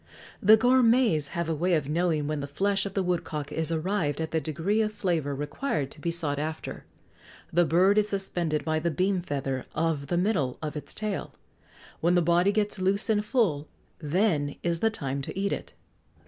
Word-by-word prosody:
The 215 +3 +7
gourmets 240 - +4
have 170 -1 -1
a 165 - 0
way 175 +3 +1
of 150 -4 -1
knowing 160 -1 +1
when 150 0 -2
the 140 - -4
flesh 195 +7 0
of 195 - -9
the 195 - +1
woodcock 165 -5 -2
is 160 0 -1
arrived 165 -3 -1
at 160 -1 -3
the 160 - 0
degree 170 +8 0
of 215 -1 0
flavour 165 -9 -1
required 145 - -2
to - - -11
be 170 - -1
sought 160 -4 -1
after: 155 +1 -5 0.7
the 175 +1 +4
bird 185 +6 +4
is 210 0 0
suspended 175 -6 -1
by 155 -1 +1
the 170 +2 0
beam 185 +3 0
feather 135 -5 -3
of 160 -4 0
the 175 - 0
middle 175 - 0
of 155 0 -5
its 150 - -5
tail; 215 -2 -4 0.6
when 175 +2 +2
the 175 - +4
body 175 +4 +3
gets 210 -1 -1
loose 195 +4 +1
and 210 -1 +2
full, 195 - +1 0.3
then 150 -2 +1
is 170 -1 0
the 225 - +3
time 140 -10 -3
to 135 - -6
eat 200 0 0
it. - - -6
170 Hz, 195 wpm, -27 LUFS, 150-200 Hz, 0.7 s, The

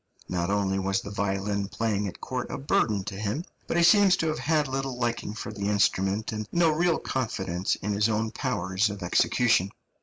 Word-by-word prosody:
Not 90 0 -1
only 100 -1 +1
was 95 0 0
the 100 - -8
violin 100 0 -1
playing 105 -1 -1
at 95 - -8
court 125 -1 -4
a - - -4
burden 110 -7 +1
to 100 - -6
him, 110 - -2 0.2
but - - -1
he 170 - +4
seems 195 +1 +6
to 165 - 0
have 155 - -2
had 155 -1 +1
little 135 -1 -3
liking 120 -3 -2
for 110 - -6
the 100 -1 -2
instrument, 100 0 +1
and 110 -1 -4
no 170 -2 +3
real 170 +1 +2
confidence 95 -8 -2
in 105 +1 -3
his 105 +2 +2
own 110 0 0
powers 105 -6 0
of 100 -2 -6
execution. 95 +2 +3
105 Hz, 195 wpm, -27 LUFS, 100-130 Hz, 0.2 s, seems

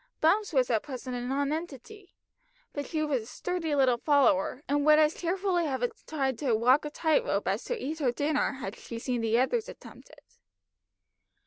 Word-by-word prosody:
Bumps 400 +6 +2
was 260 -5 +2
at 220 -2 +2
present 255 -2 -6
a 245 - -3
nonentity, 290 - -4 0.6
but 285 -1 -4
she 310 -2 -1
was 285 -5 0
a - - -11
sturdy 330 +3 -3
little 255 -4 +3
follower, 280 -3 +2
and 285 +1 +1
would 305 +1 +6
as 305 0 +4
cheerfully 360 -1 -1
have 260 -3 0 0.2
tried 270 -6 -1
to 260 -6 +1
walk 250 +7 +3
a - - -3
tight 315 +8 +1
rope - - -1
as - - -1
to - - -2
eat 315 - -4
her 265 -5 +2
dinner, 290 +3 0
had 230 -6 -6
she 230 - -8
seen 245 0 -2
the 225 0 +2
others 430 - +1
attempt - - -13
it. 295 -1 -21
285 Hz, 190 wpm, -28 LUFS, 250-315 Hz, 0.6 s, would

